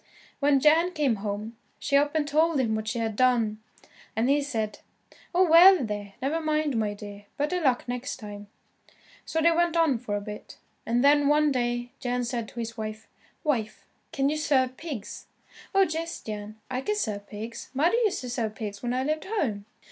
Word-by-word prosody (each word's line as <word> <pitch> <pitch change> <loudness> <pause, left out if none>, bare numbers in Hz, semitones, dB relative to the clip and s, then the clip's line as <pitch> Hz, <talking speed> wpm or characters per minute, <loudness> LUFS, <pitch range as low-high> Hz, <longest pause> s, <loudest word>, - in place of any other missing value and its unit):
When 280 -1 +4
Jan 325 +5 +4
came 285 -9 +1
home, 210 +2 -5 0.2
she 280 - -1
up 290 +2 +3
and 300 -2 +1
told 310 +1 +2
him 230 -4 +1
what 220 0 -3
she 230 +2 -2
had 225 -2 -2
done, 230 -3 +2 0.6
and 235 +5 +2
he 290 +1 +3
said, 225 -7 -3 0.5
"Oh, 365 +1 +4
well, 340 -2 +8
there, 205 -2 -5
never 310 +5 0
mind, 305 -3 0
my 210 -2 0
dear, 205 0 -10
better 325 +5 0
luck 260 -5 +1
next 245 +2 -4
time." 205 -3 -9 0.8
So 320 - -1
they 335 +1 +5
went 340 0 +2
on 310 -8 +3
for 215 -4 -3
a - - 0
bit, 210 0 -9 0.3
and 240 +2 +2
then, 290 0 +5
one 300 0 +4
day, 240 -1 -1
Jan 245 -1 -1
said 235 -2 -3
to 240 - -9
his 230 0 -4
wife, 215 0 -6 0.4
"Wife 235 -9 -1 0.3
can 275 -4 +1
you 305 - -1
serve 260 -4 +1
pigs?" 270 -9 -7 0.5
"Oh, 390 - +6
yes, 325 +1 -4
Jan, 215 0 -7
I 255 0 -3
can 420 +9 -1
serve 205 - -3
pigs. 225 +2 -7
Mother 335 - +3
used 415 -4 0
to 250 - -6
serve 225 -3 -2
pigs 205 -2 -6
when 245 0 -1
I 260 - 0
lived 310 +2 -1
home." 255 - -2
255 Hz, 195 wpm, -27 LUFS, 220-305 Hz, 0.8 s, well